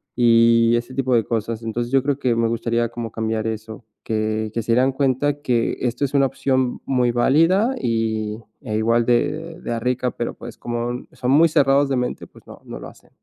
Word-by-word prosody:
y 115 -1 +4
ese 120 +2 -3
tipo 130 -1 0
de 115 -2 +3
cosas. 115 +1 -3
Entonces 120 +1 -3
yo 135 - +5
creo 140 0 -1
que 125 -4 0
me 115 0 +1
gustaría 115 0 -1
como 115 -1 -6
cambiar 110 -1 -2
eso. 110 +1 -6 0.2
Que 110 0 -1
que 115 - -1
se 115 - -2
dieran 130 +3 +3
cuenta 140 +2 0
que 120 -5 0
esto 125 +2 -1
es 140 - -1
una 140 -1 +4
opción 130 -1 -1
muy 125 -2 +1
válida 165 - +3
y 110 - -1 0.2
e 115 -7 -4
igual 115 +2 +2
de 160 +8 0
de 115 - -3
rica, 125 +1 -1
pero 120 - -4
pues 120 -1 -10
como 120 +1 -4
son 125 - -2
muy 155 +4 +6
cerrados 140 -2 +3
de 135 - 0
mente. 125 0 -3
Pues - - -20
no, - - -13
no - - -8
lo - - -9
hacen. - - -17
120 Hz, 205 wpm, -21 LUFS, 115-135 Hz, 0.2 s, muy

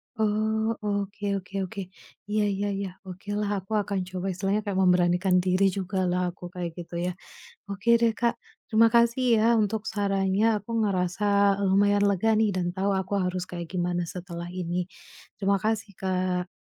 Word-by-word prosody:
Oh, 220 +1 +1
oke 200 -1 -2
oke 180 - -21
oke. 195 - -6 0.5
Iya 210 0 +1
iya 200 +1 -2
iya. 195 -1 -3 0.2
Okelah, 205 +3 -4
aku 190 - -20
akan 200 -1 -2
coba, 185 0 -5
istilahnya 195 +3 0
kayak 195 -2 -1
memberanikan 180 +1 +3
diri 185 +1 +2
jugalah 185 -1 0
aku 175 - -19
kayak 180 -1 -3
gitu 170 0 -9
ya. 180 - 0 0.6
Oke 200 +4 -3
deh, 230 -1 +4
Kak, 235 +1 +1 0.3
terima 225 +1 +5
kasih 235 +2 +4 0.2
ya - - +2 0.2
untuk 215 +1 -1
sarannya, 195 0 +1
aku 205 - -21
ngerasa 185 -1 -1 0.4
lumayan 200 +1 +3
lega 200 +3 +1
nih 220 -1 +3
dan 180 -1 0
tahu 195 +1 0
aku 190 +1 -2
harus 180 0 -2
kayak 175 -1 -6
gimana 175 -1 0
setelah 175 0 -7
ini. 180 0 -2 0.5
Terima 200 0 +2
kasih, 220 -1 -1
Kak. 185 -1 -1
195 Hz, 160 wpm, -26 LUFS, 180-210 Hz, 0.6 s, terima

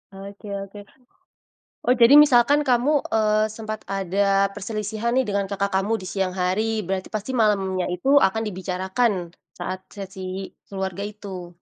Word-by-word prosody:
Oke 200 +2 -10
oke. 195 +1 -7 1.1
Oh, 250 - +5
jadi 240 +3 +6
misalkan 290 +1 +5
kamu, 260 +4 +3 0.2
eee, 215 0 +3
sempat 215 0 -7
ada 195 +1 +1
perselisihan 215 +3 -3
nih 260 - +4
dengan 200 -4 -1
kakak 200 0 -2
kamu 210 +4 0
di - - -7
siang 190 -2 -1
hari, 210 +4 0
berarti 190 +1 -3
pasti 215 +3 -5
malamnya 195 -6 +1
itu 265 +11 +3
akan 220 0 +2
dibicarakan 190 0 -1 0.2
saat 185 +1 -6
sesi 190 -1 -6 0.2
keluarga 190 0 -4
itu? 190 -4 -8
200 Hz, 140 wpm, -23 LUFS, 190-220 Hz, 1.1 s, jadi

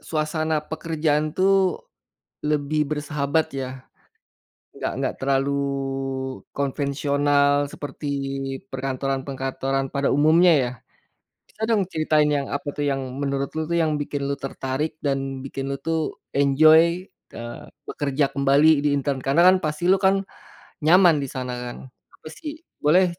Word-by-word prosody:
suasana 155 0 -1
pekerjaan 155 -2 -1
tuh 190 -1 +2 0.6
lebih 150 0 0
bersahabat 150 +1 0
ya, 135 -1 -3 1.1
enggak - - -3
enggak - - -1
terlalu 135 +1 +1 1.0
konvensional 145 +1 +1
seperti 145 0 -7 0.6
perkantoran 135 0 -2
perkantoran 135 0 -2
pada 140 0 +1
umumnya 160 +5 +5
ya. 125 -2 -1 0.8
Bisa - - -19
dong 205 -5 +2
ceritain 155 -3 +2
yang 145 -1 0
apa 140 +1 -3
tuh— 145 - -1
yang 135 0 -1 0.2
menurut 140 -1 -1
lu 160 - -1
tuh 170 +2 -1
yang 155 -2 +1
bikin 145 -1 -3
lu 140 - 0
tertarik 135 +3 -3
dan 135 -2 -2
bikin 135 0 -5
lu - - -1
tuh 160 -1 -2
enjoy, 155 +6 +5 0.3
eee, 120 0 -8 0.2
bekerja 140 0 0
kembali 140 +2 +4
di - - +4
intern. 140 -1 -1
Karena 140 +5 +3
kan 185 0 +7
pasti 155 +3 -1
lu 190 - +6
kan 195 0 +3 0.6
nyaman 175 0 +6
di - - -2
sana 130 -1 -4
kan? 125 0 -6 0.4
Apa - - -12
sih, 305 - -8 0.2
boleh, 170 +6 +4
145 Hz, 135 wpm, -23 LUFS, 135-160 Hz, 1.1 s, kan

